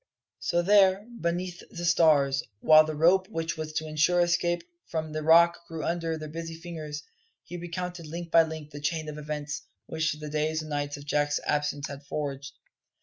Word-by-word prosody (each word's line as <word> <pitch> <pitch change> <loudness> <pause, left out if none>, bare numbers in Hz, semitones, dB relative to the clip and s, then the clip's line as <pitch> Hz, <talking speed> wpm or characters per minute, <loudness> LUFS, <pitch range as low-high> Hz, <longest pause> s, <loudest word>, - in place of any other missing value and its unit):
So 175 0 0
there, 195 +1 +5
beneath 175 +1 -2
the 175 - -5
stars, 145 -5 +4 0.2
while 155 +4 +7
the 155 0 -4
rope 180 +5 +4
which 165 -4 -3
was 155 -1 -5
to 155 0 -2
ensure 155 +4 +2
escape 175 0 +1 0.2
from 160 -1 -3
the 155 0 -3
Rock 170 +2 +6
grew 160 -1 -5
under, 165 -1 -1
their 155 0 -7
busy 165 +1 -6
fingers, 160 -3 -7 0.4
he 175 - -9
recounted 175 -1 -5
link 170 +2 -6
by 165 - +8
link 160 -2 -5
the 145 -1 -8
chain 155 +1 -1
of 150 0 -7
events 150 0 -4 0.2
which 160 -1 -1
the 150 0 -8
days 155 +1 0
and 155 -1 -9
nights 145 0 -2
of 145 - -11
Jack's 145 0 +1
absence 145 -1 0
had 140 0 -8
forged. 140 -1 -4
160 Hz, 185 wpm, -28 LUFS, 150-170 Hz, 0.4 s, by